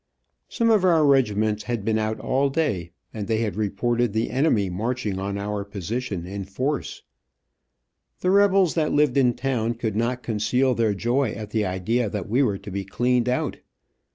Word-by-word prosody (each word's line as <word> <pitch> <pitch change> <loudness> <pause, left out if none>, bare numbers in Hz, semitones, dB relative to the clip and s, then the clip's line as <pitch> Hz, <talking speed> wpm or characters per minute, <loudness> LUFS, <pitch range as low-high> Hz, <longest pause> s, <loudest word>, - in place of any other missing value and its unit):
Some 230 -2 +1
of 210 -4 +4
our 165 -4 +4
regiments 110 -6 +2
had 120 -4 -3
been 110 -1 +1
out 110 0 -2
all 140 +2 +1
day, 135 - -1 0.2
and 105 -3 -5
they 110 0 0
reported 110 +3 0
the 110 0 -1
enemy 125 -6 +2
marching 105 +2 -2
on 100 +1 -3
our 100 0 -3
position, 100 0 -4
in 100 +2 -5
force. 130 +10 -3 1.2
The 180 - +2
rebels 195 -3 +4
that 155 -2 0
lived 145 -3 +3
in 125 -4 +3
town 120 -3 -1
could 110 -3 -3
not 120 +3 -1
conceal 125 +4 +1
their 115 -3 +1
joy 120 +7 0
at 105 -1 -7
the 105 -3 0
idea 105 +6 0
that 100 -3 -4
we 120 +6 +2
were 105 -8 +1
to 100 - -10
be 100 +1 -3
cleaned 125 +5 +1
out. 125 - -1
115 Hz, 175 wpm, -24 LUFS, 105-130 Hz, 1.2 s, of